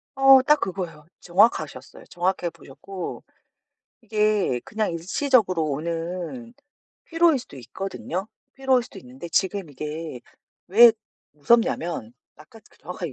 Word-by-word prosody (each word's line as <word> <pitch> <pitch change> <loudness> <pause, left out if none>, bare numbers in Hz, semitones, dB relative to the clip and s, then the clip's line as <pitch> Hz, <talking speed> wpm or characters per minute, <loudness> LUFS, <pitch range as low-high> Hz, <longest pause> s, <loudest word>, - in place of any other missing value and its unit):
어 270 -1 +7
딱 300 +2 +4
그거예요. 175 -5 -5 0.2
정확하셨어요. 195 +6 0
정확하게 175 -1 -2
보셨고 180 +7 -9 0.8
이게 210 - +1
그냥 215 -2 -2
일시적으로 185 - +1
오는 170 - -4 0.5
피로일 330 -3 +3
수도 245 - -12
있거든요. 190 - -5 0.3
피로일 265 -2 +2
수도 - - -12
있는데 130 +7 -10
지금 190 -4 0
이게 150 -1 -6 0.5
왜 230 +5 +8 0.4
무섭냐면 175 - +1 0.2
아까 215 +9 -16
그 - - -24
정확하게 175 -3 -6
185 Hz, 290 characters per minute, -24 LUFS, 165-230 Hz, 0.8 s, 왜